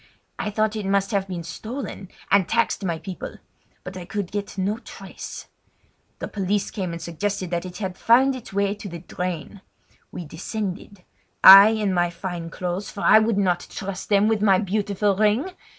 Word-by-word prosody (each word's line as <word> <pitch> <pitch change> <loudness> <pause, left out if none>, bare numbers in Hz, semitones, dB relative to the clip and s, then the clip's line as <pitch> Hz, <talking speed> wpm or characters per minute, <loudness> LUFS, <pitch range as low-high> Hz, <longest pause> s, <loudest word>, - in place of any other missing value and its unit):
I - - -2
thought 215 +1 0
it 210 -3 -3
must 195 +2 +1
have 195 -2 0
been 175 -3 -5
stolen, 200 +3 -7 0.2
and 195 -3 +4
taxed 230 -2 +1
my 170 -3 -1
people; 185 +2 -7 0.5
but 185 - -8
I 185 - -6
could 200 -1 -4
get 205 -1 -5
no 200 +4 -1
trace. - - -9 0.7
The - - -5
police 200 0 -1
came 185 -4 -3
and 170 - -5
suggested 185 +2 -3
that 175 +1 -2
it 180 0 -9
had 185 -2 -5
found 260 +4 +4
its 255 - -10
way 200 0 0
to 205 -1 -8
the 170 - -7
drain. 180 +1 -5 0.5
We 175 - -7
descended—I 195 +2 +4
in 215 -3 0
my 175 -1 +2
fine 170 -1 -6
clothes, 180 +3 -4
for 200 - -8
I 215 - +7
would 220 -1 +1
not 180 -3 +1
trust 195 -2 -6
them 205 0 +4
with 220 -2 +1
my 195 -3 +5
beautiful 200 0 0
ring! 215 - +1
195 Hz, 180 wpm, -23 LUFS, 180-210 Hz, 0.7 s, I